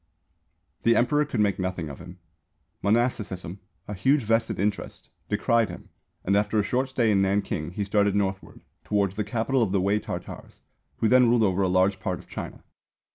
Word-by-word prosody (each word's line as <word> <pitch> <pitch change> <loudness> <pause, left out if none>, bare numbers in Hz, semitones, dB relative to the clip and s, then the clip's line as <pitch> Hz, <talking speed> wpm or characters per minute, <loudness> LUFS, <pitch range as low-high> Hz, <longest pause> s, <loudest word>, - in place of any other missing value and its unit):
The 115 0 +3
Emperor 145 +5 +2
could 125 -6 -1
make 100 -2 +1
nothing 90 -3 -3
of 70 -2 -9
him. 90 +1 -11 0.6
Monasticism, 100 -5 -1 0.3
a 105 - -5
huge 130 +8 +2
vested 115 -1 0
interest, 105 +1 -3 0.2
decried 115 -3 +2
him, 90 - -10 0.4
and 100 - +2
after 105 +1 +1
a 105 - +3
short 130 +5 -1
stay 120 -4 +1
in 100 -1 +3
Nanking 95 -4 -1
he 100 +2 -2
started 100 0 +2
northward, 95 -1 -2 0.2
towards 100 -2 0
the 105 - -1
Capital 115 +5 0
of 105 -5 +1
the 100 - +2
Wei 100 +3 +1
Tartars, - - -8 0.4
who 115 - +1
then 125 +1 +5
ruled 120 -1 +3
over 95 -1 +1
a 95 - +2
large 95 +1 +2
part 90 -1 -2
of - - -15
China. - - -7
105 Hz, 185 wpm, -26 LUFS, 95-115 Hz, 0.6 s, then